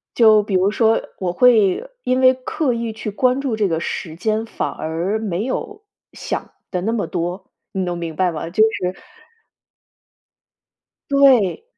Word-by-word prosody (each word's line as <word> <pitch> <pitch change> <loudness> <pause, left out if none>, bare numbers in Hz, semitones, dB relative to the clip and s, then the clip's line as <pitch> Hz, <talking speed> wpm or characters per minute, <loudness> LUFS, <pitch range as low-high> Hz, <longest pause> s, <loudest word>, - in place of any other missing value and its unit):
就 220 -3 +6
比 200 -2 -4
如 185 +2 +3
说， 225 +1 +2 0.2
我 180 -2 -2
会 230 - +3
因 255 +1 +1
为 260 0 +6
刻 255 0 -2
意 230 -1 -3
去 215 -1 -5
关 255 +5 +1
注 255 -6 -2
这 210 -2 +1
个 165 -1 -1
时 160 -2 -4
间， 215 +5 -1
反 - - -3
而 170 +7 -2
没 205 -1 -2
有 420 - -4 0.3
想 - - -5 0.2
的 180 -2 -2
那 225 +3 -1
么 225 - -1
多， 180 +2 -4 0.2
你 190 - -2
能 175 -1 -2
明 165 -2 -5
白 180 +2 +1
吗？ 165 +1 -5
就 215 +5 +3
是 185 -4 +1 2.2
对。 275 - +4
215 Hz, 175 characters per minute, -20 LUFS, 180-250 Hz, 2.2 s, 就